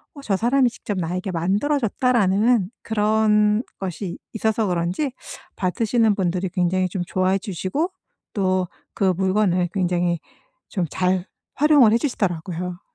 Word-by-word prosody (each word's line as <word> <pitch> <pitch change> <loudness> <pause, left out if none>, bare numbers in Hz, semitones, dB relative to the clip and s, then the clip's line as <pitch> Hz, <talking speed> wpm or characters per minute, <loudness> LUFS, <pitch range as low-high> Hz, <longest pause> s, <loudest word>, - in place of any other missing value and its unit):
'어 285 - -9
저 205 -7 +1
사람이 250 +3 +3
직접 205 -3 -5
나에게 180 +3 -3
만들어줬다.'라는 215 - +2
그런 210 0 +2 0.2
것이 185 -1 -4 0.2
있어서 220 0 0
그런지 180 - -1 0.5
받으시는 220 +3 +1
분들이 185 -1 -1
굉장히 185 0 +1
좀 180 0 -3
좋아해 185 +1 +1
주시고 200 - -2 0.4
또 185 -3 +1 0.3
그 190 -2 +2
물건을 190 -2 +2
굉장히 175 -2 0 0.5
좀 185 -5 -1
잘 185 +1 0 0.3
활용을 285 -6 +5
해 - - +5
주시더라고요. 180 - -2
195 Hz, 295 characters per minute, -22 LUFS, 180-220 Hz, 0.5 s, 활용을